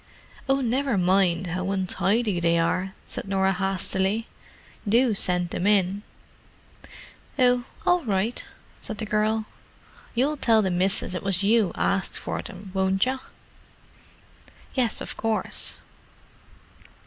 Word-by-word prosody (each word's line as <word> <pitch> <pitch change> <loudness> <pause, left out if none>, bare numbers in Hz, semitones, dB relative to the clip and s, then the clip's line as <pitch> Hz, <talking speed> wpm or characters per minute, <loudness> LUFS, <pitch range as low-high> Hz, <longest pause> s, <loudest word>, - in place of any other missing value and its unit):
"Oh, 270 0 +3
never 260 -1 0
mind 185 -1 +2
how 185 +2 -3
untidy 195 +2 +1
they 170 0 +2
are," 185 +3 0
said - - -6
Norah 195 0 +2
hastily. 190 +3 -1 0.6
"Do 235 +2 +4
send 180 -3 +4
them 185 - -1
in." 200 -1 +2 1.4
"Oh, 245 -2 +3 0.2
all 355 -1 +3
right," 210 +2 -1 0.4
said 220 - -6
the 220 - -3
girl. 215 +1 0 0.7
"You'll 280 +5 +1
tell 225 -5 +3
the 190 - 0
missus 185 +1 0
it 180 - -3
was 195 -1 0
you 215 -2 +3
arsked 195 -2 0
for - - -4
'em, 190 +1 -10
won't 190 +1 +2
yer?" 260 +1 -2 1.5
"Yes, 245 -4 0
of - - -5
course." 225 -1 -2
195 Hz, 125 wpm, -25 LUFS, 185-230 Hz, 1.5 s, Do